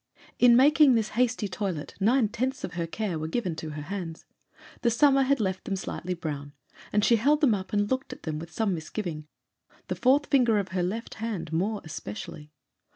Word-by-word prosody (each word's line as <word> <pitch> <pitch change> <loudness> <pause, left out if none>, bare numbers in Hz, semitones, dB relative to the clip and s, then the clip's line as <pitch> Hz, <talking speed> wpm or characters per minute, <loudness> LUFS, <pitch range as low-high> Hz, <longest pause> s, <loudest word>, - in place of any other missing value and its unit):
In 240 -1 +7
making 285 +1 +6
this 220 -2 +1
hasty 240 -2 0
toilet 185 -5 -4
nine 230 +4 +3
tenths 260 +4 -2
of - - -4
her 170 -1 -2
care 185 -2 -3
were 155 - -3
given 180 -1 -2
to 160 - -5
her 150 -1 -6
hands. 170 -1 -6 0.6
The 235 - +3
summer 275 +3 +4
had 270 0 +2
left 190 -3 -2
them 195 - -1
slightly 185 -1 -4
brown, 145 -4 -5 0.4
and 210 0 +2
she 235 - +5
held 290 +7 +3
them 280 -7 +4
up 190 -2 -4
and 205 0 +1
looked 260 +4 -2
at - - -10
them 155 -2 -3
with 165 +1 -8
some 210 +2 0
misgiving, 160 -2 -5 0.6
the - - -1
fourth 275 +3 +3
finger 245 -7 +3
of 195 -2 -1
her 185 0 -1
left 210 +7 -3
hand 185 -8 -4
more 200 +6 0
especially. 150 +1 -8
205 Hz, 200 wpm, -27 LUFS, 165-240 Hz, 0.6 s, In